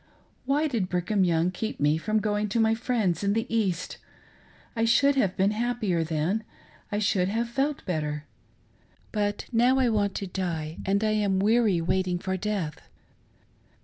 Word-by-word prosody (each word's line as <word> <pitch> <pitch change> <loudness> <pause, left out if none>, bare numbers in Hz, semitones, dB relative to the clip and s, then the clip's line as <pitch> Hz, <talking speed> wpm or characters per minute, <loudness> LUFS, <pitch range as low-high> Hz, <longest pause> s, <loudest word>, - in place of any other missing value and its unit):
Why 290 +4 +2
did 225 -10 -1
Brigham 185 +3 +1
Young 170 0 +2
keep 215 +4 -4
nle 150 +2 +2
from 215 +5 0
going 210 0 0
to 230 - 0
my 220 0 +4
friends 225 -7 0
in 200 0 +2
the 225 +1 0
East.' 185 -6 -1 0.8
I 225 - 0
should 275 +5 +4
have 200 -9 +1
been 195 +2 +3
happier 215 -6 0
then 165 +7 -1 0.2
— - - -28
I 205 - 0
should 195 -3 +1
have 230 +3 -1
felt 275 +4 -2
better. 150 -4 -2 0.9
But 205 -1 -1
now 245 +3 +4
I 260 -2 +3
want 205 -3 0
to 200 - -3
die, 170 -4 -4
and 200 +2 +2
I 215 - +2
am 205 -3 +1
weary 210 -2 +3
waiting 180 +1 0
for 190 +1 -3
death." 190 -6 -3
205 Hz, 170 wpm, -27 LUFS, 180-225 Hz, 0.9 s, my